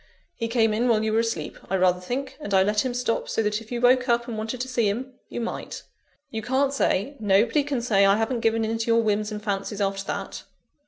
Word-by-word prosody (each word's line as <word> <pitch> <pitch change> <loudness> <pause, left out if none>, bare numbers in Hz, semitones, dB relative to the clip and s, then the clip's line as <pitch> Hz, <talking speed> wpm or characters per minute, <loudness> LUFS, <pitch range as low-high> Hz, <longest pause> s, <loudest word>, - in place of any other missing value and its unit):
He 230 - -2
came 225 -2 +2
in 235 +3 +1
while 220 -2 +3
you 220 0 0
were 225 - +3
asleep, 225 -10 -3
I 190 - +1
rather 180 -1 +3
think; 255 +8 -4
and 205 -9 -2
I 190 - +6
let 210 +2 +1
him 255 - -1
stop, 245 -2 -1
so 225 - 0
that 210 +1 -1
if 225 - -15
you 240 - -2
woke 250 +1 +4
up 235 0 +2
and 235 - -4
wanted 220 +3 -4
to 260 - -3
see 235 -5 +1
him, 255 +6 -4 0.2
you - - -5
might. 235 - -5 0.5
You 220 - -3
can't 265 +4 +1
say 275 0 0
nobody 220 +6 +3
can 275 -4 -2
say 200 -5 +3
I 195 +1 +5
haven't 225 +2 0
given 225 0 +1
in 225 +1 -2
to 225 - -2
your 230 0 +4
whims 210 0 0
and 210 0 -6
fancies 200 0 -3
after 195 0 -1
that. - - -4
225 Hz, 250 wpm, -25 LUFS, 210-245 Hz, 0.5 s, I